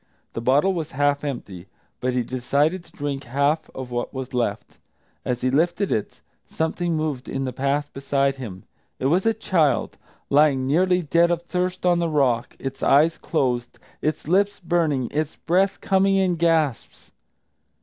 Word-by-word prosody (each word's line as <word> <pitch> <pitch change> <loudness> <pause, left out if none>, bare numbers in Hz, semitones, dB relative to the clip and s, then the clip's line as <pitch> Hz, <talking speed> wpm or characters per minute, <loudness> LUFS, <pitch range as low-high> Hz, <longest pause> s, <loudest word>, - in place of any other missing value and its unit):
The 115 - -4
bottle 140 +10 +3
was 160 -4 -4
half 145 +1 +1
empty, 100 -10 -6 0.3
but 125 0 -1
he 125 -1 +1
decided 140 +8 0
to - - -21
drink 145 -1 -4
half 140 +5 0
of 130 -1 -6
what 120 0 -2
was 130 -1 -6
left. 125 -1 -2 0.4
As 125 -1 -2
he 130 - +1
lifted 175 +7 +1
it, 105 - -2 0.3
something 165 +1 -1
moved 150 -4 -3
in 135 - -2
the 130 -1 -3
path 140 +3 -1
beside 140 0 0
him. 100 -8 -8 0.3
It - - -4
was 180 +9 +2
a 225 - +4
child, 165 - +1 0.3
lying 140 -2 +4
nearly 180 +5 +2
dead 170 +3 +3
of 170 -1 -1
thirst 180 +1 -2
on 175 -1 +4
the 170 -1 0
rock, 130 -6 +1
its 135 0 -6
eyes 155 +4 +4
closed, 125 -6 -1 0.2
its 155 -1 -2
lips 200 +4 +2
burning, 160 -7 0
its 155 +1 -2
breath 190 +4 +1
coming 195 0 +3
in 190 -2 +2
gasps. 160 -6 0
145 Hz, 165 wpm, -23 LUFS, 130-170 Hz, 0.4 s, a